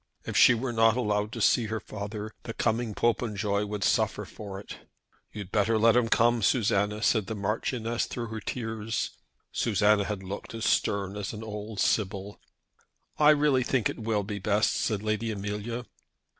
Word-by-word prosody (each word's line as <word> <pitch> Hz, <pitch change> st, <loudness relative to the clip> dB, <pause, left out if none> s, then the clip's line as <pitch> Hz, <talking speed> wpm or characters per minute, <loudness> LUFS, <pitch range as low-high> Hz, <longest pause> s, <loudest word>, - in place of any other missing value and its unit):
If -, -, -5 dB
she 120 Hz, -, +7 dB
were 120 Hz, +1 st, -3 dB
not 115 Hz, +1 st, +4 dB
allowed 105 Hz, -3 st, 0 dB
to -, -, -4 dB
see 115 Hz, -3 st, +3 dB
her 110 Hz, +1 st, -2 dB
father, 105 Hz, +1 st, -6 dB
the 115 Hz, -, -7 dB
coming 110 Hz, -1 st, 0 dB
Popenjoy 105 Hz, -3 st, 0 dB
would 105 Hz, -1 st, -3 dB
suffer -, -, +1 dB
for 100 Hz, -2 st, -8 dB
it. 100 Hz, -, -9 dB, 0.5 s
"You'd 100 Hz, -3 st, -8 dB
better 110 Hz, +1 st, +2 dB
let 115 Hz, +1 st, +5 dB
him 120 Hz, -2 st, +3 dB
come, 120 Hz, +1 st, +3 dB
Susanna," 105 Hz, -1 st, +1 dB
said 110 Hz, -5 st, +2 dB
the 110 Hz, -, -3 dB
Marchioness 115 Hz, +3 st, -1 dB
through 115 Hz, -2 st, -5 dB
her 110 Hz, 0 st, -5 dB
tears. 115 Hz, 0 st, -3 dB, 0.4 s
Susanna 105 Hz, -2 st, +2 dB
had 100 Hz, -2 st, -4 dB
looked 100 Hz, +4 st, -7 dB
as 115 Hz, 0 st, -3 dB
stern 100 Hz, -1 st, +1 dB
as 105 Hz, 0 st, -4 dB
an 110 Hz, 0 st, -7 dB
old 105 Hz, -1 st, -6 dB
sibyl. 100 Hz, -1 st, -1 dB, 0.8 s
"I 150 Hz, 0 st, +7 dB
really 145 Hz, -3 st, +4 dB
think 125 Hz, -3 st, +1 dB
it -, -, -10 dB
will 110 Hz, -2 st, 0 dB
be 100 Hz, 0 st, -5 dB
best," 105 Hz, +2 st, +2 dB
said 105 Hz, -2 st, -1 dB
Lady 110 Hz, +1 st, -1 dB
Amelia. 105 Hz, +3 st, -4 dB
110 Hz, 170 wpm, -28 LUFS, 105-115 Hz, 0.8 s, she